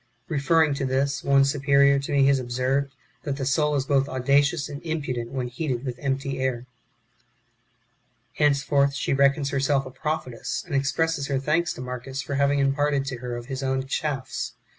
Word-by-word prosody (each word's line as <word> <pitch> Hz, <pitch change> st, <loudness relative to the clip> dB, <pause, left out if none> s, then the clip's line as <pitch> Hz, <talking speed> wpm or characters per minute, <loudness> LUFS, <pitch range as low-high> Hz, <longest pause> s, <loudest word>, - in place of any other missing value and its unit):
(Referring 155 Hz, +1 st, +3 dB
to 140 Hz, -, -3 dB
this, 135 Hz, +1 st, 0 dB
one 140 Hz, 0 st, +4 dB
superior 140 Hz, 0 st, +3 dB
to 140 Hz, -, -5 dB
me 140 Hz, -1 st, +4 dB
has 135 Hz, -1 st, +4 dB
observed, 130 Hz, +3 st, -1 dB, 0.3 s
that 140 Hz, -2 st, -3 dB
the 135 Hz, -, -3 dB
soul 150 Hz, +2 st, +2 dB
is 135 Hz, -2 st, 0 dB
both 140 Hz, 0 st, +2 dB
audacious 140 Hz, +4 st, +2 dB
and 140 Hz, -, -7 dB
impudent 140 Hz, -8 st, -3 dB
wdien 130 Hz, -2 st, -2 dB
heated 125 Hz, 0 st, -3 dB
with 125 Hz, -2 st, -5 dB
empty 135 Hz, -1 st, -2 dB
air.) 130 Hz, -2 st, -1 dB, 1.7 s
Henceforth 140 Hz, -1 st, +2 dB
she 135 Hz, -, -1 dB
reckons 140 Hz, +1 st, +2 dB
herself 135 Hz, 0 st, +1 dB
a 130 Hz, -, -8 dB
prophetess, 150 Hz, -4 st, -3 dB
and 175 Hz, -, -8 dB
expresses 140 Hz, +2 st, 0 dB
her 140 Hz, -, 0 dB
thanks 155 Hz, +5 st, +1 dB
to -, -, -9 dB
Marcus 125 Hz, +1 st, -6 dB
for 140 Hz, -, -4 dB
having 140 Hz, +1 st, +2 dB
imparted 140 Hz, 0 st, +1 dB
to 130 Hz, -2 st, -4 dB
her 120 Hz, 0 st, -5 dB
of 120 Hz, -, -8 dB
his 135 Hz, +1 st, -5 dB
ovm 130 Hz, 0 st, -1 dB
Charis. 135 Hz, -2 st, -3 dB
140 Hz, 175 wpm, -25 LUFS, 130-145 Hz, 1.7 s, one